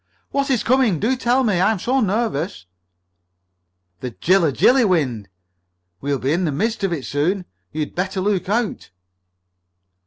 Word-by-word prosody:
"What 280 0 0
is 255 -5 +1
coming? 245 - +2
Do 240 +5 +1
tell 250 +1 +1
me. 205 -7 +1
I 190 +3 +4
am 220 - -1
so 240 +8 -2
very 215 - +2
nervous." 190 - -2 1.3
"The 125 - -4
Jilla 170 - +2
Jilly 255 - +4
wind! 140 - 0 0.7
We'll 140 0 -1
be 135 +3 -1
in 180 +2 0
the 155 - 0
midst 215 +10 -2
of 195 - +1
it 150 -6 -3
soon. 175 +7 -1 0.3
You'd 155 -1 -4
better 190 +2 -2
look 195 -1 -1
out!" 225 0 -1
190 Hz, 160 wpm, -21 LUFS, 150-230 Hz, 1.3 s, I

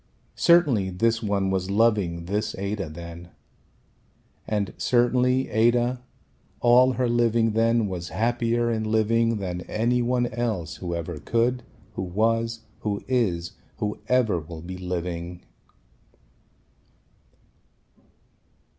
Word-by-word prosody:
Certainly 145 - +4
this 115 +5 +1
one 100 -3 0
was 95 0 -1
loving 100 -6 +1
this 105 +4 -2
Ada 100 -2 -3
then. 85 +2 -9 1.2
And 105 -3 -1
certainly 125 +1 +2
Ada 120 +2 +2 0.6
all 125 +2 +5
her 125 +1 0
living 115 -1 +2
then 115 +1 +2
was 90 -3 -5
happier 120 0 0
in 110 -1 -1
living 110 +1 +2
than 90 -3 -4
any 120 +3 +1
one 120 0 +1
else 115 -9 -3
who 85 -2 -4
ever 85 -1 -5
could, 120 - 0 0.3
who - - -4
was, 115 +4 0 0.2
who 100 -2 -3
is, 95 -10 0 0.3
who 105 -1 -3
ever 125 -8 +3
will 80 +1 -9
be 90 +1 -7
living. 90 -1 -4
110 Hz, 110 wpm, -25 LUFS, 90-120 Hz, 1.2 s, all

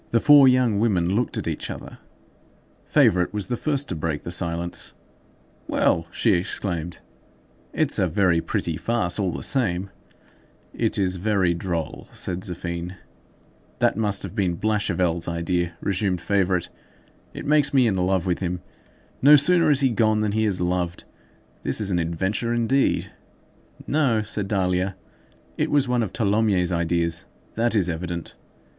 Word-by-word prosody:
The 115 - +2
four 145 +1 +7
young 125 -5 +3
women 95 -5 +1
looked 120 +3 -1
at - - -4
each - - -3
other. - - -8 0.9
Favourite 90 -1 +3
was 105 -2 -2
the 120 - -2
first 145 +2 0
to 90 - -2
break 80 -2 -3
the 85 - -6
silence. 85 -1 -1 0.7
"Well!" 85 0 +1
she 110 - +1
exclaimed, 85 -2 -3 0.7
"it's - - 0
a - - +2
very 90 -5 +2
pretty 80 -1 -2
farce, 110 -6 0
all 95 -2 +1
the 85 - -5
same." 100 -8 0 0.8
"It - - -1
is 95 -2 0
very 95 -2 +1
droll," 85 -2 -4
said 90 0 -2
Zéphine. 90 -2 -5 0.8
"That - - +2
must 105 -2 +1
have - - -6
been 95 -5 -1
Blachevelle's 90 -5 0
idea," 85 0 -1
resumed 95 -2 -1
Favourite. 95 -1 0 0.7
"It - - -7
makes 150 -1 +3
me 130 -3 +4
in 105 -4 +1
love 95 0 0
with 90 -2 0
him. 90 -1 -3 0.6
No 145 +3 +8
sooner 165 +3 +4
is 140 -2 +3
he 135 - +3
gone 110 -2 +2
than 105 -1 0
he 110 +1 +1
is 100 -4 0
loved. 90 0 -2 0.6
This - - -1
is 100 -2 -2
an 90 - +1
adventure, 95 +8 -1
indeed." 125 +4 +1 0.7
"No," 135 -8 +1
said 105 -1 -4
Dahlia; 95 -1 0 0.6
"it - - +1
was 145 -2 +2
one 125 -1 +1
of 105 -5 -2
Tholomyès' 100 -4 +1
ideas. 85 -1 -1 0.3
That 115 +1 0
is 95 -5 +2
evident. 85 0 -4
95 Hz, 155 wpm, -23 LUFS, 85-110 Hz, 0.9 s, No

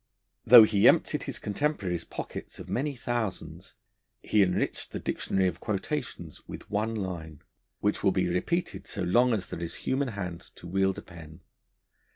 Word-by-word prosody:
Though 120 0 +11
he 105 -2 +4
emptied - - +4
his - - -4
contemporary's 100 - -2
pockets - - -7
of - - -9
many 140 +3 -1
thousands, 105 -9 -4 0.5
he 105 - +3
enriched 90 -2 0
the - - -5
Dictionary 95 -1 0
of 90 -1 -3
Quotations 110 - -4
with - - -9
one 110 +2 0
line, 85 -7 -5 0.4
which 105 - 0
will 100 - +5
be 95 -1 +1
repeated 130 - -2
so 100 - -3
long 120 +8 +4
as 105 -5 -1
there 85 - -6
is 85 - -4
human 135 +1 +1
hand 90 -7 -6
to - - -13
wield 95 +1 +1
a - - -7
pen. 80 -1 -12
95 Hz, 165 wpm, -28 LUFS, 90-115 Hz, 0.5 s, Though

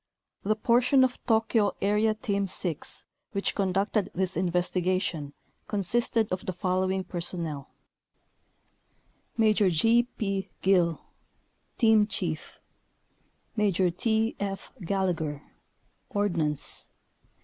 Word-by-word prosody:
The 215 +2 +1
portion 250 +4 +4
of 255 -1 -1
Tokyo 220 -2 +2
Area 210 +2 +2
Team 200 -2 -1
6 175 -4 0 0.3
which 200 -1 -2
67 200 - -1
conducted 195 +2 0
this 190 +1 -1
investigation 180 -3 0 0.3
consisted 220 +2 +1
of 185 0 -2
the 185 - -1
following 185 +1 0
personnel: 170 -5 -4 1.7
Maj. 220 -1 +3
G. 230 +8 +4
P. 195 -2 -2
Guill 175 -4 +3 0.8
Team 220 -3 +5
chief. - - -4 1.0
Maj. 205 -5 +1 0.2
T. 225 +2 +1
F. 195 -1 -4
Gallagher 165 -6 -1 0.7
Ordnance. 170 - -1
195 Hz, 95 wpm, -28 LUFS, 180-215 Hz, 1.7 s, Team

